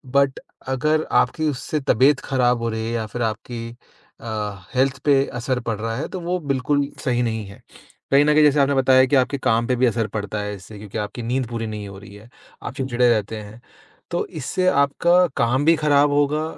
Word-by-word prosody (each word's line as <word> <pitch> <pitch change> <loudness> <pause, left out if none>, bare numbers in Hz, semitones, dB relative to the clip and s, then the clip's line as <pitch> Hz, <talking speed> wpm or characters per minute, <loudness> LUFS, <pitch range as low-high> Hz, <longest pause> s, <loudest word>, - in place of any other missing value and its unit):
But 140 -1 +3 0.3
अगर 150 +4 +1
आपकी 155 -1 0
उससे 145 +3 -3
तबीयत 135 +3 +3
खराब 125 -4 +1
हो 115 - -1
रही 110 0 -3
है 115 - -3
या 115 -2 -2
फिर 120 +3 -6
आपकी 115 +1 -4 0.5
अ, - - -12 0.5
हेल्थ 130 0 +2
पे 140 -2 +4
असर 130 +1 -1
पड़ 110 - -1
रहा 115 +1 -3
है 140 - -3
तो 185 - -5
वो 180 +2 -1
बिल्कुल 140 +2 0 0.2
सही 120 -2 +1
नहीं 110 -2 -2
है। 100 - -13 0.5
कहीं 140 +1 +5
न 150 - +4
कहीं 155 0 +5
जैसे 150 0 +4
आपने 140 0 +3
बताया 130 0 +5
कि 140 - +1
आपके 135 +1 +2
काम 115 -2 +1
पे 125 - +1
भी 125 +1 +2
असर 115 -2 0
पड़ता 105 0 -3
है 105 0 -4
इससे 100 +3 -12
क्योंकि 105 +1 -8
आपकी 105 +3 -4
नींद 125 +1 -1
पूरी 115 -1 -4
नहीं 105 -1 -6
हो 100 -1 -10
रही 100 0 -13
है, 105 +3 -15 0.3
आप - - -5
चिड़चिड़े 125 -2 +1
रहते 110 -1 0
हैं, 105 +3 -12 0.5
तो 175 - -1
इससे 185 +3 -2
आपका 170 +5 +3
काम 130 +5 +1
भी 165 +1 +6
खराब 145 -2 +3
होगा 145 +2 +1
130 Hz, 215 wpm, -22 LUFS, 115-145 Hz, 0.5 s, भी